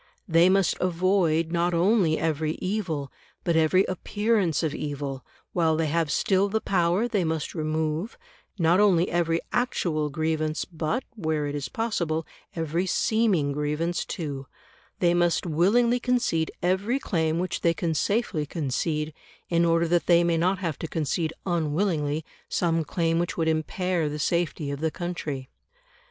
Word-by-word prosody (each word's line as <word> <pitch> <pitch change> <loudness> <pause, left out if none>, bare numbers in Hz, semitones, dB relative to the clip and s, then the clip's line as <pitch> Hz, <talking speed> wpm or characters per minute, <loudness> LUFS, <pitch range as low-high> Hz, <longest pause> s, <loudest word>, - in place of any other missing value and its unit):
They 170 +1 +5
must 195 -1 +3
avoid, 175 -2 +1
not 175 0 +1
only 175 -2 +3
every 155 -1 0
evil, 180 -9 -3 0.3
but 170 - +1
every 160 +4 +4
appearance 200 -3 0
of 155 -2 0
evil; 140 -3 -4 0.3
while 165 -3 +2
they 165 - +1
have 160 +1 0
still 195 +4 +2
the 220 +2 0
power 185 +3 +1
they 205 -6 0
must 160 -2 -2
remove, 155 - -2 0.4
not 170 +1 +3
only 185 -4 +4
every 165 -1 +1
actual 165 -11 0
grievance, 155 +1 -1
but, 170 +9 -2
where 160 -7 -1
it 145 - -3
is 140 -3 -4
possible, 170 -9 -1 0.3
every 165 +3 -1
seeming 195 -8 +2
grievance 150 +4 -1
too; 140 -5 -5 0.5
they 175 -1 +3
must 175 0 +2
willingly 215 +10 +3
concede 240 -11 +1
every 190 +8 +1
claim 160 -10 0
which 180 +1 -2
they 170 0 +2
can 170 -2 -1
safely 165 -3 0
concede, 150 +1 -2 0.4
in 170 0 +3
order 165 0 +3
that 175 +1 +1
they 170 -1 +5
may 170 -1 +2
not 180 +4 +2
have 165 -6 -3
to 165 - -4
concede 160 +1 -1
unwillingly 160 -3 0 0.2
some 165 -2 +1
claim 165 +1 0
which 175 - -2
would 165 -1 +1
impair 160 +1 0
the 150 - -4
safety 160 -1 -1
of 140 - -4
the 160 +1 0
country. 155 -6 -5
165 Hz, 150 wpm, -26 LUFS, 155-185 Hz, 0.5 s, They